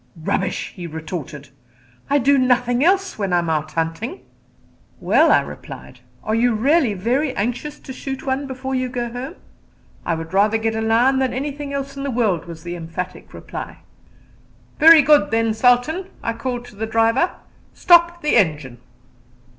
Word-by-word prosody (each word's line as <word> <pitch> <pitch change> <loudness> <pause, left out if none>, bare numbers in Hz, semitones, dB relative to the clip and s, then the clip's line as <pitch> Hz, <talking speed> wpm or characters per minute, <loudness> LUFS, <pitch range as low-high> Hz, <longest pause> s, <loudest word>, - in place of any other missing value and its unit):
"Rubbish," 185 +4 -2
he 175 -2 -7
retorted; 155 -3 -7 0.6
"I 285 - +3
do 280 +1 +3
nothing 250 0 +2
else 385 - +1
when 195 -3 -1
I 175 - +3
am 170 -2 0
out 155 0 -2
hunting." 165 - -3 0.8
"Well," - - +3
I - - +5
replied, - - -10 0.2
"are 215 - -2
you 235 +1 +2
really 265 0 +2
very 255 +8 -1
anxious 245 +8 -3
to 265 - -9
shoot 265 0 -6
one 270 +1 -2
before 265 0 -5
you 255 -1 -1
go 240 -2 -4
home?" 255 +8 -6 0.7
"I 170 - -1
would 165 +1 -7
rather 210 +3 +3
get 225 0 -1
a 220 - -2
lion 235 +4 +3
than 260 -2 0
anything 285 +1 -4
else 275 0 -4
in 275 - -6
the 280 - -3
world," 215 -10 0
was 165 -2 -10
the 175 0 -5
emphatic 175 +1 -7
reply. 85 -1 -8 1.0
"Very 320 0 +8
good, 295 +1 +4
then. 225 0 +1
Sultan," 245 - +2 0.2
I 230 - -1
called 245 0 -4
to 235 - -17
the 220 +2 -4
driver, 225 +9 +1 0.4
"stop 345 -1 +4
the 300 - +3
engine." 150 - 0
240 Hz, 170 wpm, -20 LUFS, 185-275 Hz, 1.0 s, Very